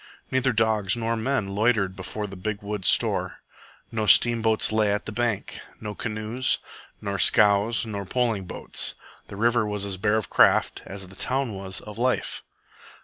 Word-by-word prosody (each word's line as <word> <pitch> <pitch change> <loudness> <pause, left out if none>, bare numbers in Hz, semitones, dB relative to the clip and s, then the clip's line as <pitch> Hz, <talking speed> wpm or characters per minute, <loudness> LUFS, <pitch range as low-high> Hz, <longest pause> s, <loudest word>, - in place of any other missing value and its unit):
Neither 130 0 +2
dogs 110 -3 +1
nor 115 0 -1
men 110 -2 -1
loitered 100 -2 +1
before 105 +2 -5
the 95 -1 -8
big 100 +2 -4 0.3
store. - - +2 0.5
No 110 -2 -2
steamboats 115 +2 +4
lay 110 -1 +2
at 105 +1 -2
the - - -5
bank, 115 -2 -2 0.2
no 105 -1 -5
canoes, 110 +4 -1 0.4
nor 100 -2 -3
scows, 105 +3 +4
nor 100 -3 -4
poling 115 -3 0
boats. - - -3 0.3
The - - -9
river 120 +2 +2
was 105 -1 -2
as 95 -2 -2
bare 105 +3 +2
of 110 - -2
craft - - +3
as 95 -1 -7
the 95 - -12
town 130 +1 -1
was 95 -1 -4
of 105 +1 -10
life. 125 +1 0
110 Hz, 160 wpm, -25 LUFS, 100-115 Hz, 0.5 s, steamboats